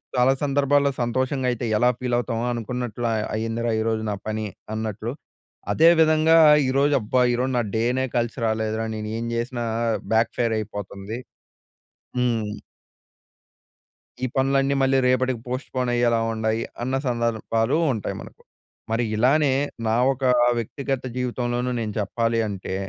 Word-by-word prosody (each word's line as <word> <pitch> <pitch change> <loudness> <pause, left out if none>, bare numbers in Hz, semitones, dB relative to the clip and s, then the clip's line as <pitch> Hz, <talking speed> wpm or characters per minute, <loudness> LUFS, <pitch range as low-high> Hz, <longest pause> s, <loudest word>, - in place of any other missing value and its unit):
చాలా 125 +2 +4
సందర్భాల్లో 140 0 +2
సంతోషంగా 130 +2 0
అయితే 120 0 -3
ఎలా 125 +2 +4
ఫీల్ 125 -1 -1
అవుతామో 120 -1 -2
అనుకున్నట్లు 120 0 -3 0.3
అయ్యిందిరా 115 +1 -1
ఈరోజు 110 0 0
నా - - -1
పని 110 0 -2 0.3
అన్నట్లు. 110 +1 -3 0.6
అదే 165 +2 +6
విధంగా 155 +1 +5 0.3
ఈరోజు 140 +2 +2
అబ్బా! 125 +4 +1
ఈరోజు 130 +2 0
నా 120 - +2
డేనే 125 +4 +1
కలిసి 120 +2 -1
రాలేదురా 110 0 -1
నేను 105 0 -5
ఏం 115 - -3
చేసినా 120 +1 -2 0.5
బ్యాక్ 115 +1 +3
ఫైర్ 115 -2 +1
అయిపోతుంది. 105 +1 -6 1.0
హ్మ్. 115 -4 0 1.7
ఈ - - +3
పనులన్నీ 135 +1 +2
మళ్ళీ 135 0 +3
రేపటికి 130 -1 +1
పోస్ట్‌పోన్ 130 0 -3
అయ్యేలా 120 -1 +2
ఉండాయి. 110 0 -1 0.2
అన్న 130 +2 -1
సందర్భాలు 115 +1 0 0.2
ఉంటాయి 110 - -4
మనకు. - - -13 0.5
మరి 115 +2 +1
ఇలానే 135 +5 +3 0.3
నా 110 - +2 0.2
ఒక 130 +1 -9 0.3
వ్యక్తిగత 135 +3 -3
జీవితంలోనూ 125 0 -1
నేను 105 -2 -3
చెప్పాలి 115 +3 0
అంటే 95 -2 -5
120 Hz, 130 wpm, -23 LUFS, 110-130 Hz, 1.7 s, అదే